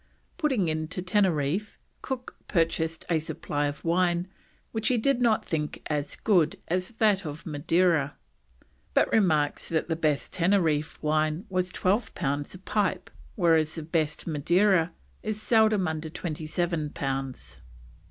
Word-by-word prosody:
Putting 265 - +1
in 155 0 -1
to 180 +3 -4
Teneriffe, 185 -1 +1 0.2
Cook 255 -2 -5
purchased 165 -2 0
a 165 -2 +2
supply 145 -1 -2
of 145 +3 -6
wine, 175 +1 +2 0.4
which 220 -1 -1
he 250 - +3
did 250 +2 +2
not 230 -3 +3
think 150 -2 -2
as 145 -1 -2
good 175 -8 +2
as 180 +2 0
that 205 -3 +3
of 150 -1 -7
Madeira, 160 -1 +1 0.8
but - - +3
remarks 155 -9 +2
that 165 +1 -1
the 165 - +1
best 155 -3 0
Teneriffe 165 -5 +2
wine 155 +4 +1
was 185 0 0
"12 200 +5 0
pounds 145 +4 -2
a - - -7
pipe, 190 -1 -1 0.2
whereas 160 -4 +3
the 160 - -5
best 155 -1 -1
Madeira 170 +3 +3 0.3
is 215 -1 -3
seldom 215 -4 +3
under 160 0 -3
27 160 -1 -2
pounds." 135 -1 -4
170 Hz, 140 wpm, -27 LUFS, 155-190 Hz, 0.8 s, he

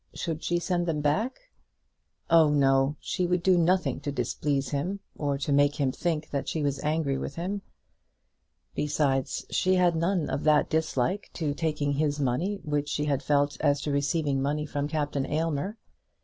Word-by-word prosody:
Should 165 -2 -4
she 175 - +1
send 175 0 -1
them 160 -2 0
back? 225 - -1 0.8
Oh 165 -2 +6
no; 135 0 +3
she 180 -1 -1
would 180 -1 0
do 185 0 +5
nothing 170 -5 +2
to 145 0 -4
displease 135 +1 -1
him, 175 +9 -2 0.2
or 145 -2 -1
to 140 +1 -3
make 145 +1 +4
him 140 -3 +1
think 155 +1 -2
that 140 -1 -2
she 155 - -2
was 140 -1 0
angry 150 -3 0
with 140 - -5
him. 190 +4 -3 1.1
Besides, 140 -3 0
she 185 0 +2
had 180 -2 +3
none 170 0 +1
of - - -2
that 150 -1 +3
dislike 160 +3 0
to 155 -4 -2
taking 150 -2 -1
his 145 0 0
money 145 +10 0
which 145 -1 -1
she 150 - -1
had 140 -2 0
felt 145 0 +1
as 145 -2 +3
to 145 - -2
receiving 140 -1 0
money 150 +2 -1
from 145 -1 -2
Captain 145 -3 -1
Aylmer. 160 +6 -1
150 Hz, 175 wpm, -27 LUFS, 140-165 Hz, 1.1 s, Oh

